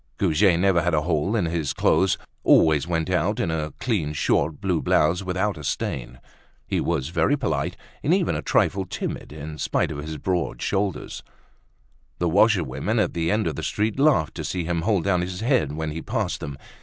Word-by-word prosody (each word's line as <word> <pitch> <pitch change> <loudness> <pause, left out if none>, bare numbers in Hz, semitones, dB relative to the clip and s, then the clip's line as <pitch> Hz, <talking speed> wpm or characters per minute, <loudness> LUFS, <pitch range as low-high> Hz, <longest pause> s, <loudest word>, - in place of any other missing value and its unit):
Goujet 85 +2 +3
never 95 -2 +3
had 85 -1 +1
a 75 - +1
hole 85 +5 0
in 105 -6 +1
his 80 -3 -1
clothes, 95 -1 +2 0.3
always 75 -2 +4
went 80 -2 -1
out - - +1
in 80 - 0
a 80 -1 -2
clean 90 -12 -1
short 75 +1 +1
blue 90 -4 0
blouse, 85 +4 +2
without 95 0 -1
a - - -8
stain. 60 -2 -3 0.5
He - - -1
was 80 -5 -1
very 90 - +2
polite, 135 - -2 0.2
and - - 0
even - - +2
a - - -2
trifle 95 -1 +1
timid, - - -5
in 75 +1 -8
spite - - 0
of - - -5
his 80 +1 -5
broad 90 +3 -2
shoulders. 95 -3 -2 1.0
The 85 - 0
washerwomen 95 - +2
at 100 -6 +1
the 85 -1 -1
end 105 +2 +1
of 80 -4 -1
the - - -4
street 110 +4 -1
laughed 140 - +3
to - - -4
see 90 -2 -2
him 85 0 -1
hold 100 -1 +1
down 90 -3 +2
his 90 +2 -4
head 115 - +1
when 80 0 -3
he 80 +2 -5
passed 110 -4 -2
them. 70 -1 -6
85 Hz, 195 wpm, -24 LUFS, 75-100 Hz, 1.0 s, always